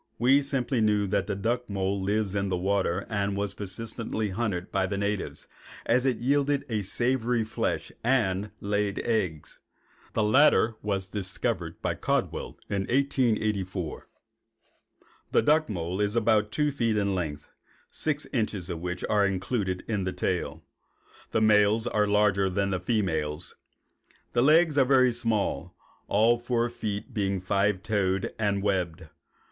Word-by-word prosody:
We 130 +4 +4
simply 135 -3 -1
knew 105 -1 +3
that 100 0 0
the 100 - -1
duck 120 +4 -1
mole 100 0 -1
lives 100 0 0
in 100 -1 -1
the 90 - 0
water 95 0 0
and 100 -2 -1
was 100 -1 -1
persistently 110 +2 -4
hunted 95 -3 -2
by 95 -1 +1
the 100 - -3
natives, 100 0 -3 0.4
as 125 +3 +2
it 125 -4 +1
yielded 140 +2 +1
a 110 -2 0
savory 120 +3 0
flesh 110 - -2
and 105 -5 +1
laid 105 0 -1
eggs. 90 -10 -2 0.5
The 110 - +1
latter 115 +1 +5
discovery 95 -1 -2
was - - -17
made - - -40
by - - +1
Caldwell - - -2
in 100 -1 -1
1884. 110 - 0 1.2
The - - +4
duck 155 0 +3
mole 90 0 -3
is 105 +1 0
about 110 -2 +2
two 150 -1 +1
feet 115 -5 0
in 100 -1 +1
length, 75 -5 -4 0.4
six 150 -1 -2
inches 105 -7 -1
of 85 - -4
which 90 0 -3
are 105 -1 +3
included 95 -1 -2
in 105 -4 -1
the 95 - -1
tail. 80 -4 -2 0.7
The 110 - 0
males 105 +1 +4
are 105 -3 +1
larger 100 -2 +3
than 100 +1 0
the 95 - 0
females. 90 -6 -1 0.8
The 120 - +3
legs 155 +2 +5
are - - +7
very 130 -1 +4
small, 115 -3 -1 0.3
all 115 +3 +3
four 120 0 0
feet 110 -4 -4
being 100 -2 0
five 100 +1 0
toed 100 -3 0
and 100 -2 0
webbed. 90 -4 -1
105 Hz, 150 wpm, -27 LUFS, 95-115 Hz, 1.2 s, are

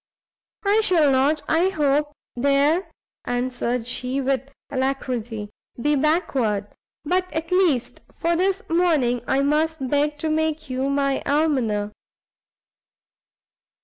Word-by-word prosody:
"I 415 +2 +4
shall 330 -9 +4
not, 280 +3 +2
I 335 +4 +3
hope, 295 -4 +1 0.2
there," 280 +7 +2 0.4
answered 245 -1 -2
she, 250 +2 -2
with 270 0 -1 0.2
alacrity, 250 -5 -2 0.3
"be 295 +4 +2
backward; 265 - +1 0.4
but 365 +3 0
at 325 +1 -4
least 350 -10 +1
for 340 0 0
this 385 +5 0
morning 310 -9 +2
I 275 +1 +2
must 300 -1 0
beg 295 +1 +1
to 315 +2 -2
make 315 -1 -1
you 260 +2 -1
my 275 -1 0
Almoner." 260 -9 +1
285 Hz, 115 wpm, -23 LUFS, 255-320 Hz, 0.4 s, I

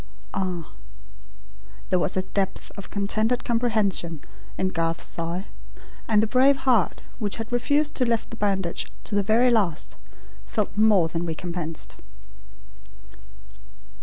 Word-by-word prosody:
"Ah 180 -4 -3 0.6
" - - -22
There 185 - +4
was 175 - +1
a 185 - +1
depth 195 0 -2
of 200 - -8
contented 215 +5 0
comprehension 215 -9 +1 0.4
in 185 - +1
Garth's 165 -2 -1
sigh; 170 +3 -3 0.6
and 215 -1 +4
the - - +4
brave 260 +5 +5
heart, 240 -8 +3 0.2
which 205 -3 -1
had 225 +1 -6
refused 290 +5 +2
to 255 - +3
lift 230 -2 0
the - - -5
bandage 195 -4 0 0.2
to - - -7
the 205 - +4
very 230 +5 +4
last, 195 -8 +1 0.5
felt 210 -2 -1
more 210 -5 +5
than 165 +1 -3
recompensed. 165 -1 -4
200 Hz, 135 wpm, -25 LUFS, 170-230 Hz, 0.6 s, brave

